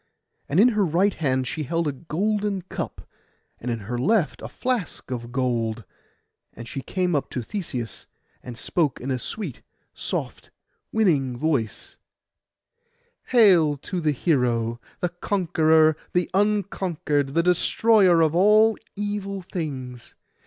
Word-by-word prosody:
And 150 - +2
in 235 +5 +7
her 215 -3 +1
right 185 +4 +2
hand 130 -4 0
she 155 - -3
held 165 +3 -1
a - - +1
golden 195 +7 -2
cup, 185 - -6 0.5
and 125 - -5
in 115 -2 -2
her 120 +4 -4
left 180 - +1
a - - -5
flask 245 - -3
of 120 -1 -5
gold; 120 -3 -1 0.7
and 115 0 -9
she 135 - -5
came 180 +4 -1
up 145 - -1
to 125 - -4
Theseus, 125 - -5 0.3
and 120 -2 -9
spoke 150 -2 0
in 135 +2 -4
a 130 - -1
sweet, 175 - -5 0.3
soft, - - -4 0.4
winning 145 - +2
voice— 135 -6 -2 1.3
'Hail 180 - +5
to 180 +6 -4
the 155 -2 +2
hero, 120 -6 0 0.2
the 180 - +1
conqueror, 160 -4 +2 0.2
the 180 -1 0
unconquered, 185 -8 0
the 170 - +3
destroyer 180 0 +4
of 160 -1 +3
all 210 +5 +5 0.2
evil 200 -1 -3
things! 130 -9 -6
160 Hz, 135 wpm, -24 LUFS, 130-195 Hz, 1.3 s, in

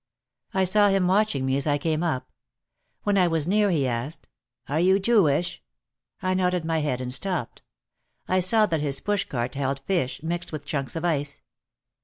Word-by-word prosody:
I 190 - +3
saw 205 +2 +4
him 195 -2 +2
watching 185 -8 +2
me 130 +1 +1
as 140 - 0
I 145 -1 +2
came 155 +1 -1
up. 130 - -2 0.7
When 205 -1 +2
I 180 - +4
was 165 -2 0
near 205 +2 +3
he 155 -7 +1
asked, 125 +6 -4 0.4
"Are 150 +3 0
you 190 +3 +4
Jewish?" 185 -7 +2 0.6
I 185 0 +1
nodded 180 -2 0
my 160 -1 0
head 140 -4 -1
and 125 0 -3
stopped. 175 -5 -3 0.7
I 185 - +2
saw 215 +4 +4
that 160 -6 -1
his 140 -2 -1
push 205 -1 -1
cart 120 -1 -3
held 135 0 -2
fish, 140 -4 -2
mixed 170 +1 -3
with 155 -2 -6
chunks 140 0 -3
of 165 +1 -3
ice. 145 -4 -2
165 Hz, 185 wpm, -25 LUFS, 140-185 Hz, 0.7 s, saw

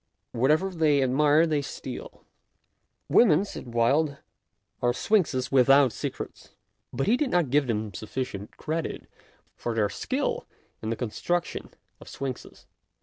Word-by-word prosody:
Wherever 155 +10 +2
they 155 -5 +3
admire, 150 +5 +4
they 155 -3 0
steal. 140 - -8 0.4
" - - -50
Women," 195 -5 +6
said 125 -10 -8
Wilde, 140 +5 +2 0.3
" - - -49
are 120 0 +2
sphinxes 140 - +1
without 135 0 +6
secrets." - - -6 0.4
But 135 - -1
he 225 - +4
did 270 +1 0
not 175 - +1
give 145 -1 +3
them 110 -3 -2
sufficient 105 -1 -5
credit 160 +1 -3 0.5
for 120 -1 -4
their 105 -2 +2
skill - - -2 0.3
in 110 - -3
the 115 - 0
construction 150 +10 -2 0.3
of - - -12
sphinxes. 130 -2 -6
140 Hz, 140 wpm, -27 LUFS, 120-160 Hz, 0.5 s, Women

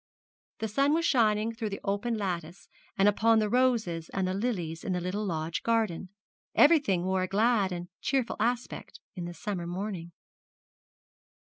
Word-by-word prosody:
The 220 - -2
sun 275 +7 +2
was 335 0 +1
shining 220 -4 +2
through 225 -1 -3
the 200 - -5
open 205 +3 -1
lattice 175 -3 -4 0.3
and 195 - +4
upon 225 +2 +4
the 215 -1 +1
roses 230 -10 +1
and 190 -1 -1
the 185 - -1
lilies 185 -7 -2
in 190 - -1
the 180 - 0
little 185 +4 -3
lodge 165 -4 -2
garden. 220 -6 0 0.5
Everything 285 - +5
wore 190 0 0
a 185 - 0
glad 210 0 +2
and 175 0 -5
cheerful 265 -4 0
aspect 240 +3 -2 0.2
in 175 -3 -5
the 175 - -6
summer 180 -4 -4
morning. 180 -1 -4
205 Hz, 160 wpm, -29 LUFS, 180-230 Hz, 0.5 s, Everything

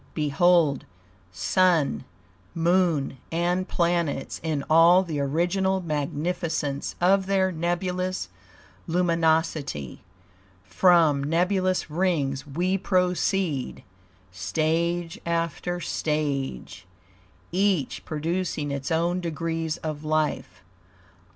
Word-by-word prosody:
Behold 155 0 +2 0.5
Sun, 165 - +1 0.5
Moon 165 -5 +1
and 175 +3 0
planets 170 -6 -1
in 155 -3 -2
all 170 +4 +6
the 160 -5 -4
original 175 +7 +1
magnificence 155 -2 -2
of 190 +2 +3
their 190 -1 +2
nebulous 180 - -2 0.6
luminosity; 160 - 0 0.6
from 165 - +3
nebulous 180 +2 0
rings 150 -6 0
we 180 +7 0
proceed, 180 -5 0 0.5
stage 165 - -1
after 170 +1 -2
stage, 145 - -3 0.6
each 185 -6 0
producing 160 -1 -2
its 140 -1 -4
own 170 +2 +1
degrees 165 -1 -3
of 155 -2 -5
life. 155 - -1
165 Hz, 80 wpm, -25 LUFS, 150-180 Hz, 0.6 s, all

